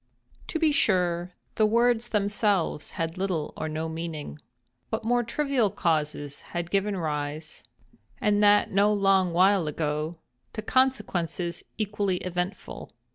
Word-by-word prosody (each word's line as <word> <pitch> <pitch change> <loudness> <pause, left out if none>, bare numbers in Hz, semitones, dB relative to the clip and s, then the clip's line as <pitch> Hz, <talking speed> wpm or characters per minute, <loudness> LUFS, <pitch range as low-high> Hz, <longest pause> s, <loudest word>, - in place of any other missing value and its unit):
To - - -2
be 320 -1 +3
sure 180 -9 +1 0.2
the 215 - +4
words 235 +1 +2
themselves 205 -6 0
had 165 +2 -3
little 180 -6 -2
or 155 - -3
no 155 +1 -3
meaning. 160 -2 -5 0.5
But 220 0 -2
more 245 +1 +3
trivial 245 -1 +1
causes 150 -5 -1
have 175 0 -5
given 200 0 +1
rise—and 155 - -3
that 205 0 +5
no 200 +2 +4
long 195 -3 +3
while 185 0 +4
ago—to 150 - -4
consequences 190 -10 0
equally 205 -3 0
eventful. 180 +1 -5
185 Hz, 120 wpm, -27 LUFS, 160-210 Hz, 0.5 s, that